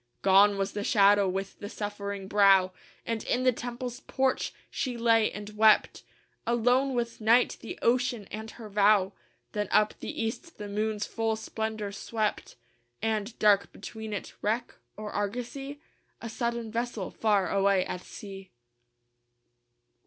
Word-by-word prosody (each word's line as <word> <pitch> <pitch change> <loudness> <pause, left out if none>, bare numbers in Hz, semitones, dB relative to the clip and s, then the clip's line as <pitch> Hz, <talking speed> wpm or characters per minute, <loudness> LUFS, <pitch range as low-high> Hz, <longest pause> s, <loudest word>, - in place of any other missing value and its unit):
Gone 200 +1 +6
was 195 0 -1
the 205 - -4
shadow 200 -2 +4
with 195 +1 -4
the 205 - -6
suffering 200 -2 -5
brow; 195 -2 +5 0.3
And 230 -1 -2
in 250 - 0
the 255 - +5
temple's 245 +1 -5
porch 265 -1 0 0.2
she 250 -3 -2
lay 230 -1 +3
and 210 0 -7
wept, 215 0 +4 0.5
Alone 250 +3 +2
with 235 -1 -2
night, 230 +3 +4
the 230 - -7
ocean, 245 -3 +1
and 220 +1 -6
her 220 -1 -10
vow. 200 -1 +3 0.4
Then 210 -2 -2
up 215 0 +3
the - - -4
east 285 +10 -5
the 210 - -6
moon's 210 +1 -1
full 225 -1 -1
splendor 220 -1 -4
swept, 215 +1 -3 0.5
And, 220 0 -1
dark 205 -2 +4
between 220 -1 -8
it 205 - -5
wreck 225 +4 -1 0.2
or 210 -1 -6
argosy? 245 +7 -4 0.4
A 230 - -6
sudden 235 -1 -3
vessel 230 -4 -3
far 205 -4 +1
away 195 -1 +3
at 180 - -5
sea. 195 -1 -10
215 Hz, 145 wpm, -28 LUFS, 200-235 Hz, 0.5 s, Gone